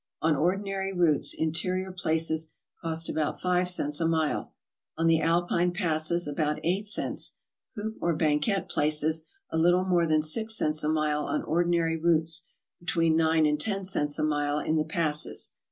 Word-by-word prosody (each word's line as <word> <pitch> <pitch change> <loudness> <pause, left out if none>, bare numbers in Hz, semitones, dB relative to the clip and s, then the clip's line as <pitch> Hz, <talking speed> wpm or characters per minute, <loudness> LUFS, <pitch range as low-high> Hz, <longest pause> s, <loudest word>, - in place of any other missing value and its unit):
On 160 0 +2
ordi 180 +7 0
nary 195 -1 -3
routes 170 -5 +1
interieur 180 +4 -1
places 160 -2 -1 0.3
cost 165 0 -2
about 155 -1 -2
5 180 0 +1
cents 150 -5 -1
a 165 - +2
mile; 160 -2 0 0.5
on 165 - 0
the 165 -1 +3
Alpine 175 +1 +1
passes, 170 -2 0
about 150 +1 -1
8 190 +5 0
cents; 210 - 0 0.4
coupe 220 0 -5
or 170 -1 +1
banquette 155 +5 0
places, 155 +2 0 0.2
a 160 - 0
little 175 +3 +3
more 175 -3 +2
than 155 -1 +2
six 220 +8 0
cents 155 0 -1
a 150 - 0
mile 155 -1 0
on - - -2
ordinary 170 0 +1
routes, 165 0 +2 0.3
between 165 -2 +1
9 160 -1 +3
and 150 0 +1
10 195 -1 +1
cents 150 -6 0
a - - -1
mite 145 -1 0
in 160 - +1
the 155 - +2
passes. 155 -1 0
165 Hz, 170 wpm, -27 LUFS, 155-175 Hz, 0.5 s, the